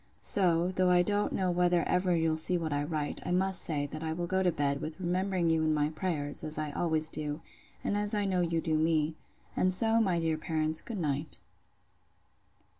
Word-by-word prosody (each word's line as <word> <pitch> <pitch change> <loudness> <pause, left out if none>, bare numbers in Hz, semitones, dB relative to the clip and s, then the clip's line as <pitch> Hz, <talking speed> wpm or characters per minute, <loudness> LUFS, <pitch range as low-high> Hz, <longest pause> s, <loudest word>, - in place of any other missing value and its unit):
—So, 175 -2 +3
though 185 -1 +2
I 175 0 +4
don't 205 +2 0
know 185 -2 0
whether 175 -1 +2
ever 180 -1 +1
you'll 160 -1 +1
see 175 +3 +3
what 160 -3 -3
I 145 - 0
write, 150 -1 -3
I - - -5
must 190 +1 +1
say, 145 -3 -1
that 155 +2 -7
I 160 -1 -2
will 175 +1 -3
go 190 +2 0
to 180 -2 +2
bed, 140 -2 -1
with 155 +1 -6
remembering 185 0 0
you 160 -1 +2
in 155 -1 +1
my 150 0 +1
prayers, 155 -3 -2
as 155 0 -1
I 155 -1 -3
always 160 0 0
do, 150 -1 -4 0.4
and - - -1
as 205 +1 0
I 205 -1 0
know 185 -2 +1
you 165 -1 0
do 155 -1 0
me: 160 -1 +1 0.4
And 185 - +2
so, 225 +4 +5
my 185 -5 +1
dear 160 -1 -1
parents, 155 -1 0
good 230 - -6
night. 150 -3 -2
165 Hz, 210 wpm, -30 LUFS, 155-185 Hz, 0.4 s, so